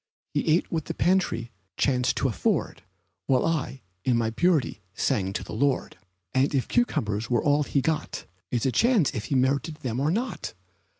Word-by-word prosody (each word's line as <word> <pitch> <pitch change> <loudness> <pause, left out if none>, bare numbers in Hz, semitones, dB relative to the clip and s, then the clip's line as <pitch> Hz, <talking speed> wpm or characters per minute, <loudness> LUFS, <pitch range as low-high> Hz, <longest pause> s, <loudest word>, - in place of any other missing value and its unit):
He - - 0
ate 160 +3 +2
what 160 -3 -1
the - - -4
pantry 175 -11 +1 0.3
chanced 125 -3 +2
to - - +2
afford, 110 -8 -1 0.5
While 130 -2 +3
I, 150 -5 -2 0.2
in 125 -2 +2
my 115 -1 0
purity, 155 - +1
sang 95 -2 0
to - - -3
the - - -8
Lord; 135 +4 0 0.4
And 135 +3 +2
if 130 - +1
cucumbers 110 - 0
were 120 -2 +2
all 145 0 +3
he 140 -1 +1
got 160 +2 -2 0.2
It's 120 0 -1
a 130 - +3
chance 230 - +3
if 110 - -4
he 135 - -1
merited 140 +5 +1
them 130 -6 -3
or 145 +3 +1
not. 230 +8 -2
135 Hz, 180 wpm, -26 LUFS, 120-160 Hz, 0.5 s, While